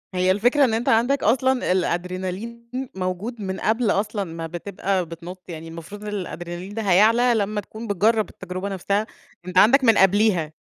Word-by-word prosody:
هي 185 +1 +3
الفكرة 245 +9 +3
إن 235 - 0
أنت 225 +2 0
عندك 245 +5 +2
أصلًا 260 +1 +2
الأدرينالين، 185 +6 -2 0.3
موجود 190 +5 -4
من 190 -1 -4
قبل 220 0 +1
أصلًا 205 0 -1
ما 165 -2 -6
بتبقى 185 +2 -2
بتنُطّ، 170 +3 -9
يعني 165 -1 -7
المفروض 170 +5 -9
إن - - -6
الأدرينالين 180 -1 -6
ده 225 - -3
هيعلى 220 +5 +4
لمّا 210 0 -1
تكون 220 +3 -9
بتجرب 215 +2 +2
التجربة 185 +2 -6
نفسها، 200 +3 -1 0.4
أنت 180 0 -4
عندك 250 +8 +6
من 225 -3 +5
قبليها. 195 -5 +3
200 Hz, 165 wpm, -23 LUFS, 180-225 Hz, 0.4 s, عندك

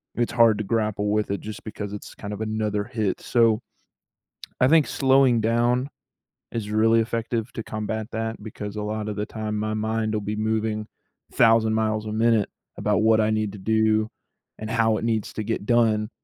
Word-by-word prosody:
it's 120 0 0
hard 115 -3 +5
to - - -1
grapple 105 -1 -1
with 105 -1 0
it 100 - -1
just 110 0 -8
because 105 -2 -6
it's 105 - -8
kind 105 0 -6
of 105 - -6
another 110 -1 -1
hit, 105 -2 -2
so 115 -2 +3 1.0
I 130 - +6
think 160 -2 +5
slowing 130 -3 +3
down 120 +4 +1 0.6
is 105 -3 -4
really 115 +1 +4
effective 115 0 -3
to - - -4
combat 110 0 -4
that, 115 0 -3
because 105 -1 -7
a 105 - -3
lotta 105 0 -3
the 105 +1 -3
time, 110 -1 -4
my 110 +1 -2
mind 110 0 -1
will 105 - -1
be 105 +1 -3
moving 110 0 -1 0.5
thousand 115 -1 +4
miles 110 -1 0
a - - -4
minute 110 -1 +2 0.3
about 105 -1 +1
what 110 0 +5
I 110 - +2
need 110 -2 0
to 105 - -8
do, 110 +1 +2 0.5
and 110 0 -5
how 115 -1 +2
it - - -5
needs 115 -2 -1
to 110 - -3
get 110 -1 -3
done, 110 -2 +2
110 Hz, 190 wpm, -24 LUFS, 105-115 Hz, 1.0 s, I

